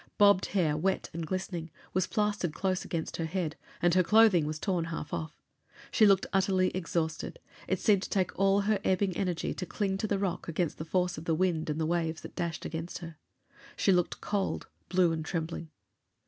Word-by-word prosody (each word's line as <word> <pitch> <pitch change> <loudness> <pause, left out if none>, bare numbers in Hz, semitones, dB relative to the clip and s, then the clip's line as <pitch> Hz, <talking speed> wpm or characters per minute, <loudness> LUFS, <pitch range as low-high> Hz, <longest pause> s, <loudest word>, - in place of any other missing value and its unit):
Bobbed 200 -2 +5
hair, 165 -7 +1
wet 185 +5 -1
and 165 -1 -4
glistening, 180 -3 -3 0.2
was 185 0 +1
plastered 210 -6 0
close 185 -2 0
against 165 -2 -3
her 165 - -1
head, 165 -2 -2 0.3
and 175 -1 +4
her 185 - +5
clothing 200 -4 +5
was 155 0 -3
torn 175 -1 -1
half 165 -2 -5
off. 155 -1 -4 0.5
She 215 - +6
looked 195 -1 +4
utterly 190 -1 +3
exhausted; 170 - -2 0.3
it - - 0
seemed 205 -4 +4
to - - -5
take 190 -2 +1
all 195 +1 +4
her 205 0 +1
ebbing 190 -1 +1
energy 180 -3 -1
to 180 - -4
cling 195 -2 -1
to 215 - -1
the 200 - +1
rock 195 -3 -2
against 165 0 -1
the 155 - -4
force 180 0 0
of 160 - -10
the 165 - +2
wind 165 -2 0
and 150 +1 -1
the 160 - +1
waves 165 -1 -1
that - - -10
dashed 170 -3 -3
against 160 +2 -4
her. 165 -2 -9 0.6
She 195 - +3
looked 180 -1 0
cold, 205 -2 -1 0.2
blue 180 -2 +4
and 160 -1 -2
trembling. 165 -1 -4
180 Hz, 200 wpm, -30 LUFS, 165-195 Hz, 0.6 s, She